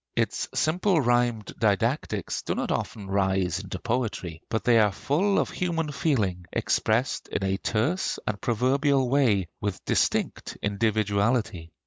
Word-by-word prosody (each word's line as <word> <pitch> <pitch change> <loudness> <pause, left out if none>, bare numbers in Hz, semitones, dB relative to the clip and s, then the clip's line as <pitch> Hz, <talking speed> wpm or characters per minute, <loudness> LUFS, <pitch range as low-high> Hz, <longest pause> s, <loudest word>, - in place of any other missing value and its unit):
Its - - 0
simple 175 +3 +2
rhymed 120 -4 +1
didactics 110 - 0
do - - -2
not - - -2
often 105 -3 -3
rise 95 -2 0
into 95 -2 -6
poetry; 110 -8 -3
but 110 - -1
they 120 -2 +5
are 105 -2 +4
full 180 - +1
of - - +1
human 165 -4 -1
feeling, 105 - 0
expressed 115 +5 0
in - - -3
a 95 0 0
terse 120 - 0
and 105 -1 -3
proverbial 135 +3 +2
way, 120 -9 +2
with 100 -3 -4
distinct - - 0
individuality. 105 -3 0
110 Hz, 135 wpm, -26 LUFS, 100-135 Hz, -, they